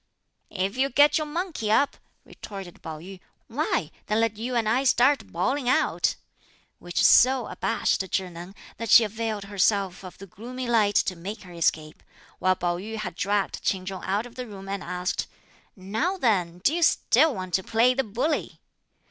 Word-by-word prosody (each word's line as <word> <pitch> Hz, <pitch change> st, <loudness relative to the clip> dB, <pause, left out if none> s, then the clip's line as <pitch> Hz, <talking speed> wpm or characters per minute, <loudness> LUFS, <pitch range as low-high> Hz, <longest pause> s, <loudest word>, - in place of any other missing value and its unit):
"If 195 Hz, +3 st, -2 dB
you 270 Hz, +1 st, +2 dB
get 290 Hz, +4 st, +5 dB
your 305 Hz, -, -3 dB
monkey 310 Hz, -, -3 dB
up," 280 Hz, +6 st, +3 dB, 0.3 s
retorted 195 Hz, -4 st, -10 dB
Pao 160 Hz, -1 st, -7 dB
yü, 185 Hz, +4 st, -11 dB, 0.3 s
"why, 235 Hz, -, -1 dB, 0.2 s
then 210 Hz, +1 st, +1 dB
let 225 Hz, -1 st, +1 dB
you 240 Hz, +4 st, -4 dB
and 230 Hz, -2 st, +1 dB
I 245 Hz, +5 st, +2 dB
start 265 Hz, +2 st, +3 dB
bawling 260 Hz, -1 st, 0 dB
out;" 310 Hz, +5 st, +2 dB, 0.6 s
which 175 Hz, 0 st, 0 dB
so 260 Hz, +1 st, +6 dB
abashed -, -, 0 dB
Chih 185 Hz, -2 st, -1 dB
Neng 175 Hz, +3 st, -10 dB, 0.2 s
that 230 Hz, -1 st, -5 dB
she 235 Hz, -, +8 dB
availed 220 Hz, -1 st, -3 dB
herself 200 Hz, -1 st, 0 dB
of 185 Hz, -, -10 dB
the 195 Hz, -, -10 dB
gloomy 245 Hz, +7 st, -7 dB
light 215 Hz, -4 st, +2 dB
to 185 Hz, -, +2 dB
make 200 Hz, +6 st, -7 dB
her 180 Hz, -2 st, -12 dB
escape; 155 Hz, -2 st, -1 dB, 0.4 s
while 185 Hz, 0 st, +3 dB
Pao 175 Hz, -1 st, -1 dB
yü 215 Hz, +5 st, -6 dB
had 210 Hz, -5 st, -4 dB
dragged 200 Hz, +3 st, -1 dB
Ch'in 185 Hz, -1 st, -1 dB
Chung 190 Hz, 0 st, -6 dB
out 200 Hz, +4 st, -1 dB
of 245 Hz, -, -12 dB
the 250 Hz, 0 st, -6 dB
room 195 Hz, -2 st, -10 dB
and 195 Hz, -1 st, -4 dB
asked, 180 Hz, +1 st, -3 dB, 0.5 s
"Now 220 Hz, -, -2 dB
then, 185 Hz, -, +1 dB
do 290 Hz, -, +3 dB
you 345 Hz, -, -1 dB
still 310 Hz, -3 st, +3 dB
want 185 Hz, -1 st, -6 dB
to 190 Hz, -, +2 dB
play 235 Hz, +5 st, +3 dB
the 270 Hz, +1 st, 0 dB
bully!" 255 Hz, +8 st, -2 dB
210 Hz, 180 wpm, -25 LUFS, 185-250 Hz, 0.6 s, she